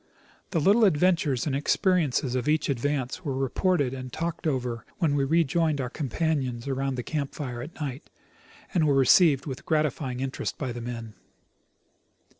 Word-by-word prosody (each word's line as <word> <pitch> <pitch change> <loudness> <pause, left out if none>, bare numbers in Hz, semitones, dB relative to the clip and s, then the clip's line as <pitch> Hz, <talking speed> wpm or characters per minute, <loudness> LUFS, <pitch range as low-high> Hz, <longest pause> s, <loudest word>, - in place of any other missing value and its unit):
The 170 - 0
little 205 +9 +4
adventures 165 - +3
and 140 -3 0
exijeriences 145 -3 +1
of 130 +3 0
each 155 -1 +1
advance 140 +3 -1
were 140 -5 -2
reported 135 +1 +1
and 130 -1 -6
talked 170 +3 -3
over 125 -5 -2
when 160 -5 +1
we 140 -1 +2
rejoined 160 0 +2
our 125 -2 -3
companions 135 -4 -2
around 135 0 -1
the 125 - -4
camp 145 -1 -3
fire 125 -5 -5
at 155 +6 -9
night, 140 0 -5 0.6
and 165 -5 +3
were 140 - +3
received 135 +1 +5
with 135 -4 -6
gratifying 150 -5 -1
interest 135 0 -3
by 130 -4 -3
the 120 0 -6
men. 115 -2 -6
140 Hz, 160 wpm, -27 LUFS, 130-160 Hz, 0.6 s, received